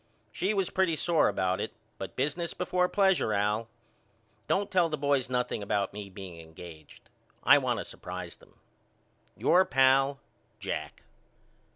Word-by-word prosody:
She 200 Hz, +3 st, -1 dB
was 195 Hz, -2 st, 0 dB
pretty 185 Hz, -4 st, +2 dB
sore 165 Hz, 0 st, +2 dB
about 95 Hz, -2 st, 0 dB
it -, -, -4 dB, 0.3 s
but -, -, -6 dB
business 150 Hz, +5 st, -2 dB
before 180 Hz, 0 st, +1 dB
plesure 190 Hz, -, +2 dB
Al. 105 Hz, +3 st, 0 dB, 0.8 s
Don't 200 Hz, +1 st, 0 dB
tell 180 Hz, -3 st, +3 dB
the 155 Hz, -, -2 dB
boys 140 Hz, -2 st, +1 dB
nothing 125 Hz, -3 st, -1 dB
about 100 Hz, -1 st, -1 dB
me 100 Hz, -1 st, -7 dB
being 95 Hz, -3 st, -9 dB
engaged. 80 Hz, -1 st, -13 dB, 0.4 s
I -, -, +7 dB
want -, -, 0 dB
to -, -, -4 dB
surprise 90 Hz, -1 st, -7 dB
them. -, -, -22 dB, 0.8 s
Your 185 Hz, +2 st, +5 dB
pal, 135 Hz, -1 st, +3 dB, 0.4 s
JACK. -, -, -5 dB
135 Hz, 145 wpm, -29 LUFS, -, 0.8 s, I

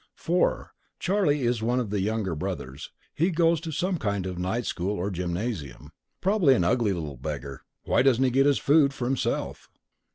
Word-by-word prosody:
"4. 175 Hz, +2 st, 0 dB, 0.2 s
Charlie 175 Hz, -8 st, +1 dB
is 120 Hz, -1 st, +1 dB
one 120 Hz, +3 st, +1 dB
of 115 Hz, -5 st, -3 dB
the 105 Hz, -2 st, 0 dB
younger 105 Hz, -3 st, -1 dB
brothers. 75 Hz, -5 st, -5 dB, 0.2 s
He 170 Hz, +5 st, +1 dB
goes 165 Hz, -2 st, +2 dB
to 165 Hz, -1 st, -5 dB
some 175 Hz, +3 st, -1 dB
kind 100 Hz, -5 st, -1 dB
of 90 Hz, -1 st, -4 dB
night 105 Hz, +7 st, -1 dB
school 95 Hz, +4 st, -2 dB
or 95 Hz, +3 st, -2 dB
gymnasium. 90 Hz, -, -4 dB, 0.3 s
Probably 185 Hz, -9 st, +4 dB
an 90 Hz, -, +1 dB
ugly 105 Hz, +4 st, +2 dB
little 80 Hz, -7 st, -4 dB
beggar. 70 Hz, 0 st, -6 dB, 0.2 s
Why -, -, +2 dB
doesn't 130 Hz, -1 st, +3 dB
he 130 Hz, -, +2 dB
get 135 Hz, +3 st, +4 dB
his 145 Hz, -, +3 dB
food 140 Hz, -1 st, +3 dB
for 125 Hz, -, -3 dB
himself? 130 Hz, 0 st, -2 dB
115 Hz, 185 wpm, -26 LUFS, 90-145 Hz, 0.3 s, Probably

